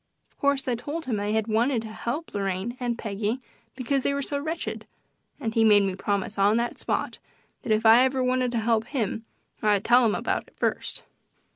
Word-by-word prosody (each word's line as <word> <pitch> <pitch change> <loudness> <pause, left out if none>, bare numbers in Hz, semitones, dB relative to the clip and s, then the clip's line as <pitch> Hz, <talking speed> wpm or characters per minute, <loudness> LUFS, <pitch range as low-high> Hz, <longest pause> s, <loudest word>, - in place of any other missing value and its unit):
Of - - -38
course 280 -1 +1
I 250 - +1
told 290 +8 -4
him 235 -5 -1
that 205 - -2
I - - 0
had 220 -1 +1
wanted 230 +2 +1
to 220 - -7
help 240 +8 -4
Lorraine 195 +3 -2
and 240 -2 -2
Peggy 215 +3 -2 0.4
because 265 +1 0
they 280 - 0
were 280 - -1
so 285 +1 -2
wretched, 320 +3 -4 0.5
and 225 -1 -3
he 225 -1 +3
made 210 -2 +6
me 195 -1 0
promise 200 +1 -2
on 205 +3 +4
the 240 0 0
spot - - -3 0.4
that 245 - -3
if 215 +1 +2
ever 255 +4 +6
I - - +1
wanted 255 -1 +1
to - - 0
help 225 -1 +1
him 225 -4 -2 0.4
I'd 205 -2 +2
tell 245 +1 +6
him 220 -3 +2
about - - -2
it - - -24
first. - - -2
230 Hz, 215 wpm, -26 LUFS, 215-255 Hz, 0.5 s, made